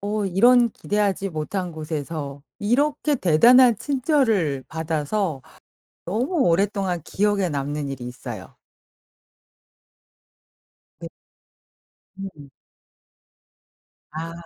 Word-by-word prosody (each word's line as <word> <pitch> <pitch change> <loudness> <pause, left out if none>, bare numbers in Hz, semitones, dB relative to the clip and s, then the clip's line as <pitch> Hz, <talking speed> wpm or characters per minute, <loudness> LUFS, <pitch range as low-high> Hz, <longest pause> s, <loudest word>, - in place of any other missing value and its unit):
어 205 +1 -2
이런 235 +6 +5
기대하지 200 -2 -1
못한 175 +2 -4
곳에서 150 -2 -5 0.2
이렇게 285 +7 +1
대단한 240 - +5
친절을 225 - 0
받아서 160 0 -2 0.6
너무 230 - -2 0.2
오랫동안 190 0 0
기억에 200 -2 0
남는 145 0 -3
일이 135 -3 -6
있어요. 120 -5 -8 2.5
네. - - -6 1.1
음음. 155 -8 -9 1.6
아. 165 +2 -5
185 Hz, 185 characters per minute, -23 LUFS, 150-215 Hz, 2.5 s, 이런